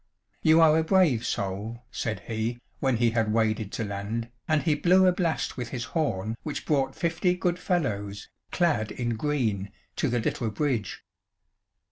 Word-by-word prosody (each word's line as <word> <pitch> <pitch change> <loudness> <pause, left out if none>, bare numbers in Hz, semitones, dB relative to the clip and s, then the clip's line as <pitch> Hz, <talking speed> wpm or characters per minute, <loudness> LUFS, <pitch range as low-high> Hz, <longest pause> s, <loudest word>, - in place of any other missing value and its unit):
"You 160 +1 +5
are 155 -1 +6
a - - +2
brave 160 - +3
soul," 105 +5 -3
said 110 -4 -3
he, 115 +2 -3 0.2
when 130 -4 +1
he 115 0 +3
had 115 -2 +1
waded 110 -2 +1
to - - -2
land, 105 +3 -4 0.2
and 155 -2 +2
he 160 - +3
blew 180 +5 +4
a 185 - +6
blast 175 -6 -1
with 120 -2 -4
his 125 -3 -4
horn 115 - -1
which 150 - -5
brought 135 -3 +1
fifty 170 +2 +1
good 180 -1 -1
fellows, 105 - -2 0.2
clad 155 - +1
in 120 -1 -2
green, 110 -8 -1 0.3
to 145 - +1
the 120 - +1
little 115 0 -1
bridge. 120 -4 -2
120 Hz, 165 wpm, -27 LUFS, 110-160 Hz, 0.3 s, are